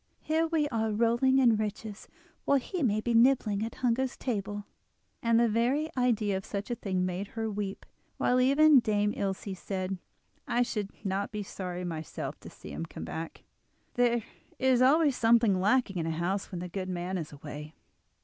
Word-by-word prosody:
Here 320 +1 +1
we 315 -2 +1
are 225 -3 0
rolling 235 +5 +3
in 240 -5 +5
riches 215 0 -5 0.4
while 280 - +4
he 345 +7 -4
may 215 -5 +2
be 235 +1 -1
nibbling 230 -4 +4
at 225 - -5
hunger's 250 +2 +1
table." 205 -4 -3 0.6
And 230 0 +3
the 235 - +4
very 250 +8 +1
idea 230 -5 +1
of 190 - -3
such 205 +4 -5
a - - 0
thing 185 -4 -1
made 185 +2 -3
her 225 +1 -3
weep, 200 -1 -4 0.3
while 250 0 +2
even 280 +2 +6
Dame 210 -2 +1
Ilse 195 -1 -3
said: 190 -1 -3 0.5
"I 245 +1 +2
should 210 -4 -3 0.2
not 195 +1 -1
be 210 -1 -4
sorry 180 -2 -5
myself 160 -3 -5
to - - -11
see - - -11
him 80 +3 -5
come 80 - -7
back—there 235 - -3 0.3
is 260 -2 +3
always 285 +1 +5
something 225 -5 +4
lacking 205 -2 +2
in 165 - -2
a - - 0
house 175 +5 -2
when 175 -2 -4
the 180 - -4
good 185 +1 -4
man 180 +1 -3
is 155 -3 -6
away." 150 +1 -9
215 Hz, 180 wpm, -29 LUFS, 190-245 Hz, 0.6 s, even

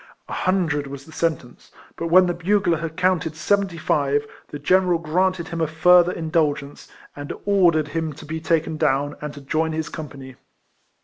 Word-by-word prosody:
A - - -7
hun 185 -1 +1
dred 150 -2 -2
was 140 0 -9
the 160 - -14
sentence; 160 -7 -3 0.2
but 170 - -4
when 185 +2 +6
the 175 - 0
bugler 175 -1 +1
had 165 -1 -6
counted 180 -4 +1
seventy 195 +2 0
five, 145 -2 0 0.2
the 145 - -7
general 180 +4 +3
granted 170 +2 0
him 165 -1 -4
a 160 - +2
further 175 +3 +5
indulgence, 155 -4 -2 0.3
and 145 0 -7
ordered 175 -7 +3
him 160 +1 -2
to - - -12
be 160 +2 -4
taken 160 0 0
down, 145 -1 0
and 150 0 -4
to 145 - -10
join 160 +3 -1
his 160 0 -3
company. 135 -4 -9
160 Hz, 180 wpm, -22 LUFS, 145-175 Hz, 0.3 s, when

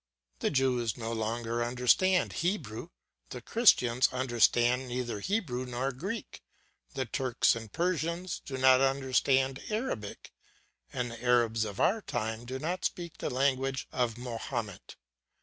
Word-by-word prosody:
The - - +1
Jews 125 -5 +1
no 115 -1 -4
longer 115 +1 -2
understand 125 +10 +2
Hebrew, 170 - -2 0.4
the 125 - -6
Christians 125 - +4
understand 125 0 +2
neither 120 -3 -3
Hebrew 140 - -2
nor 125 +2 -2
Greek; 190 - -6 0.5
the 135 -1 -1
Turks 125 0 +1
and 115 -2 -8
Persians 170 +1 -1
do 135 - -5
not 130 0 +6
understand 135 0 +2
Arabic, 210 - -4 0.6
and 120 -1 -3
the 115 0 -9
Arabs 115 -2 +3
of 100 -2 -7
our 220 +2 +3
time 110 - -3
do 130 +2 -4
not 175 +6 -3
speak 170 -2 -3
the - - -2
language 135 0 0
of 120 -3 -1
Mahomet. 115 -4 -5
125 Hz, 130 wpm, -30 LUFS, 120-140 Hz, 0.6 s, not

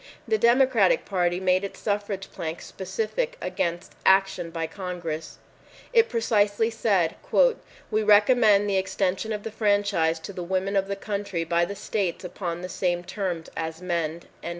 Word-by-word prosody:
The 440 - +2
Democratic 240 -5 +4
Party 175 -2 0
made 185 0 +2
its 200 - -6
suffrage 205 -2 -3
plank 165 0 -5
specific 225 - -3
against 170 0 -3
action 190 -3 +3
by 165 0 -3
Congress. 170 -3 -5 0.6
It 460 -1 +5
precisely 225 -1 +2
said, 195 -7 +1 0.7
"We 215 0 +2
recommend 210 0 +5
the 195 -1 +1
extension 190 +2 -1
of 210 -1 -3
the 225 - -5
franchise 205 -6 +1
to 200 - -7
the 180 - -5
women 190 +3 -1
of 195 0 +2
the 200 - -2
country 200 -4 -3
by 170 +1 +1
the 200 +3 -6
states 195 -3 -2
upon 175 -1 -4
the - - -3
same 175 -1 -1
terms 180 -3 -4
as 160 0 -4
men." 170 -2 -2
195 Hz, 150 wpm, -25 LUFS, 175-210 Hz, 0.7 s, It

